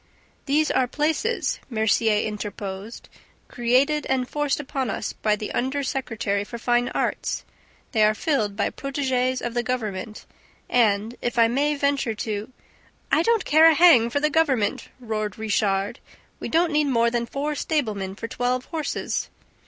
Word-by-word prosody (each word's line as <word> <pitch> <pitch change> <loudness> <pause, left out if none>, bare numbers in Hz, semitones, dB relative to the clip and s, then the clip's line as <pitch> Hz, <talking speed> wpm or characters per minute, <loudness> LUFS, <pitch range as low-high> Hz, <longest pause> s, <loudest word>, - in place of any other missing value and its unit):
"These 300 +3 +2
are 255 - +2
'places,'" 320 - -1
Mercier 220 -2 +2
interposed, 210 0 -6 0.4
"created 260 +5 +1
and 260 -1 0
forced 295 0 -1
upon 270 -3 -3
us - - -3
by 215 -1 +1
the 210 0 -6
under 265 +3 -1
secretary 225 -7 -2
for 235 +3 -8
fine 240 +1 +1
arts. - - -2 0.5
They 220 -2 +3
are 215 0 +4
filled 215 -6 0
by 205 - 0
protegees 260 -2 -1
of 240 - -3
the 240 - +1
government 215 -4 -4 0.4
and, 220 -2 +2
if 240 0 -2
I 230 -1 +6
may 285 +5 +1
venture 280 -5 0
to 215 +1 -4 0.3
..." - - -34
"I 315 - +4
don't 455 +3 +2
care 315 +2 +7
a 320 - +3
hang 290 -9 +6
for 285 - 0
the 300 +1 +1
government!" 265 -10 +1
roared 215 -4 -3
Richard. 205 0 0 0.4
"We - - -5
don't 335 +1 +2
need 300 -1 +2
more 235 -3 +2
than 235 -1 -1
four 290 +4 -2
stablemen 215 - -2
for 230 - -6
twelve 250 +2 -1
horses." 315 -4 -3
245 Hz, 160 wpm, -24 LUFS, 215-285 Hz, 0.5 s, care